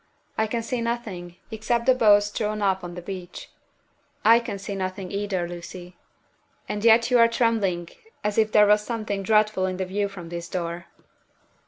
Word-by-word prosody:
"I 220 - +1
can 230 +1 -2
see 240 +1 -2
nothing, 215 -7 -4 0.2
except 235 +2 -1
the 260 - +6
boats 205 -4 +4
drawn 210 0 -2
up 190 -1 +1
on 175 0 -7
the 175 - -8
beach." 185 -2 -8 0.7
"I 230 +2 +7
can 235 -4 -5
see 195 +1 -6
nothing 185 -1 -4
either, 200 -3 -2
Lucy." 175 +1 -9 0.7
"And 205 0 -4
yet 230 +2 +5
you 245 - +5
are 230 - +7
trembling 215 -7 0 0.4
as 210 +1 0
if 215 -1 +2
there 210 -1 +6
was 210 0 +4
something 215 -3 -3
dreadful 215 -1 +2
in 185 -1 -3
the 190 - -2
view 200 +2 -1
from 180 -4 -10
this 170 0 -6
door." 170 -1 -4
205 Hz, 180 wpm, -24 LUFS, 185-220 Hz, 0.7 s, I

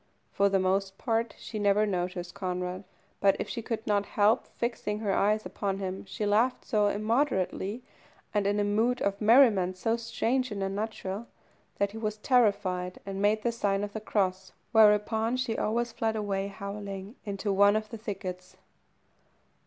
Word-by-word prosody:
For 200 0 +3
the 195 - +3
most 190 +1 0
part 230 -1 -1
she 215 - -6
never 205 +1 +3
noticed 180 -2 -3
Conrad, 180 -1 -4 0.3
but 195 -1 +4
if - - -3
she 235 - -4
could 225 -1 -4
not 205 -2 +1
help 210 +2 +2
fixing 235 -3 -2
her 210 -2 -1
eyes 210 +2 +2
upon 195 -2 -2
him, 190 0 -4
she 210 +2 -4
laughed 225 +5 +2
so 210 -4 +2
immoderately, 215 -1 0 0.5
and 205 -2 +1
in 205 +1 +1
a - - +2
mood 225 +5 +1
of 200 +1 -1
merriment 210 -6 +5
so 225 +5 0
strange 235 +3 -1
and 200 -2 -3
unnatural, 200 +1 -4 0.5
that 200 0 +1
he 220 - -7
was 215 -1 -2
terrified 200 -7 +1
and 195 0 -4
made 215 +1 +2
the 235 - +1
sign 200 -3 0
of 205 0 -5
the 220 - -4
cross, 190 -3 -1 0.2
whereupon 220 +2 +4
she 240 -3 -1
always 235 +2 0
fled 225 -1 -1
away, 200 -2 -1
howling, 200 +1 -7
into 200 -1 -2
one 200 +1 +5
of 215 0 -2
the 230 - -5
thickets. 185 -4 -6
205 Hz, 170 wpm, -29 LUFS, 195-225 Hz, 0.5 s, merriment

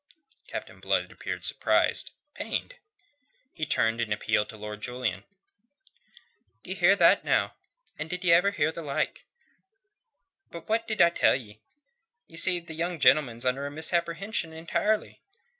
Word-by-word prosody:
Captain - - -7
Blood - - 0
appeared - - -5
surprised, - - +2 0.2
pained. - - -4 0.8
He 155 -3 -3
turned 115 -2 +1
in 115 -2 -2
appeal 105 0 +1
to 110 - -10
Lord 105 0 -7
Julian. 120 -5 -3 1.4
"D'ye 185 - -3
hear 190 0 +4
that 170 -4 +5
now? - - +1 0.5
And 155 +1 -3
did 180 +2 -2
ye 175 - +4
ever 180 +4 +5
hear 160 -5 0
the 165 - -7
like? 145 -3 -2 1.2
But 170 -1 -10
what 225 +1 0
did 215 -5 +3
I 170 - +5
tell - - +3
ye? 110 -4 -8 0.7
Ye 165 - -14
see, 180 +1 +4
the 170 -1 -10
young 170 +1 -3
gentleman's 130 -5 +3
under 135 +3 0
a - - -5
misapprehension 170 +3 -1
entirely. 205 +6 -1
160 Hz, 145 wpm, -27 LUFS, 125-180 Hz, 1.4 s, that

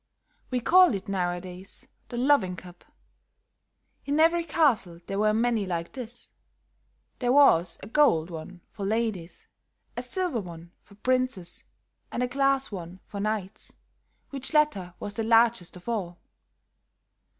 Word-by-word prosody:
"We 255 - 0
call 360 - +6
it, 195 - -6
nowadays, 180 0 -4 0.2
the 240 - -5
loving 250 -8 +3
cup. 180 -1 -13 1.2
In 285 +2 -1
every 335 +2 +4
castle 255 - +1
there 195 0 -3
were 215 0 +3
many 225 -2 +1
like 170 -2 -3
this; 245 -2 -8 0.9
there 245 -1 +1
was 185 - +5
a - - -7
gold 205 - +3
one 175 +2 -8
for 200 - -7
ladies, 210 -4 -2 0.5
a - - -3
silver 360 - -2
one 170 -2 -10
for 200 - -20
princes 255 -6 -1 0.5
and 245 - -1
a - - +1
glass 275 0 +1
one 180 -1 -7
for 200 - -7
knights, 215 0 -4 0.6
which 275 +2 -4
latter 200 -13 +2
was 205 - -5
the 225 - -2
largest 225 -5 +3
of 180 +3 -14
all. 190 -7 -3
215 Hz, 140 wpm, -27 LUFS, 180-255 Hz, 1.2 s, call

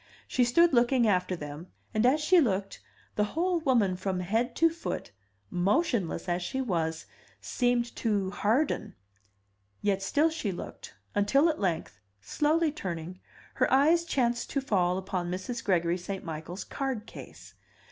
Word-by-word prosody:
She 250 - +2
stood 330 +7 +4
looking 240 0 +4
after 185 -2 +1
them, 150 +1 -8 0.3
and 215 +2 +3
as 280 +4 +4
she 335 +3 +5
looked, 195 -6 -1 0.4
the 210 - +3
whole 355 0 +2
woman 240 - +2
from 185 0 -2
head 225 +7 0
to 330 - +5
foot, 330 0 -4 0.4
motionless 195 - 0
as 175 0 0
she 265 +10 -3
was, 165 -9 -1 0.3
seemed 245 -1 0
to 200 -4 0
harden. 235 +10 0 0.8
Yet 200 -2 0
still 295 +11 +2
she 275 -11 -2
looked, 175 - -8 0.2
until 270 +11 +3
at 310 - -2
length, 160 - -2 0.2
slowly 305 - +1
turning, 180 - -6 0.3
her - - +1
eyes 315 +6 +5
chanced 240 -7 0
to 280 - 0
fall 185 -9 +1
upon 185 -2 -3
Mrs. 190 +7 -4
Gregory 175 -3 +1
St. 190 +2 -5
Michael's 165 +3 -6
card 265 -6 -3
case. - - -12
210 Hz, 145 wpm, -29 LUFS, 180-270 Hz, 0.8 s, she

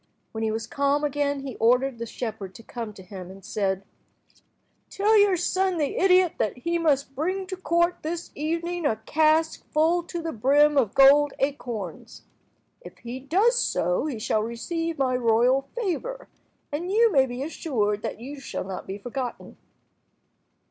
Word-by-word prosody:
When 220 0 -4
he 220 - +1
was 220 +1 -3
calm 280 +3 0
again, 285 -1 0
he 270 -4 -6
ordered 250 +2 +2
the 235 - -4
shepherd 215 -5 -6
to 230 - -12
come 230 -1 -6
to 190 - -12
him, 185 -1 -9
and 195 0 -12
said— 195 -2 -1 1.1
"Tell 420 +2 +2
your 405 -3 +5
son, 370 +1 0
the 295 -3 -1
idiot, 365 -2 +4
that 215 - -1
he 340 +6 -1
must 280 -4 +1
bring 370 +8 -2
to 375 0 -5
the 370 - -24
court 345 0 +2
this 335 +2 -5
evening 335 +3 -2
a 220 - +1
cask 315 +3 +2
full 325 +3 +2
to 345 - -5
the 330 -1 -3
brim 290 +5 +4
of 245 -8 +2
gold 280 +1 +6
acorns. 240 - -4 0.6
If - - -12
he 240 +2 -7
does 395 - +2
so 180 - 0
he 270 -6 -3
shall 215 0 0
receive 330 +9 -3
my 260 -2 +1
royal 250 +3 +2
favour, 480 +4 -3 0.4
and 340 +6 -3
you 455 +2 +4
may 270 -5 +4
be 245 +2 -4
assured 220 -10 -1
that - - -5
you 275 +4 -8
shall - - -5
not 190 0 -7
be 195 - -5
forgotten." 245 +3 -6
280 Hz, 170 wpm, -25 LUFS, 230-335 Hz, 1.1 s, gold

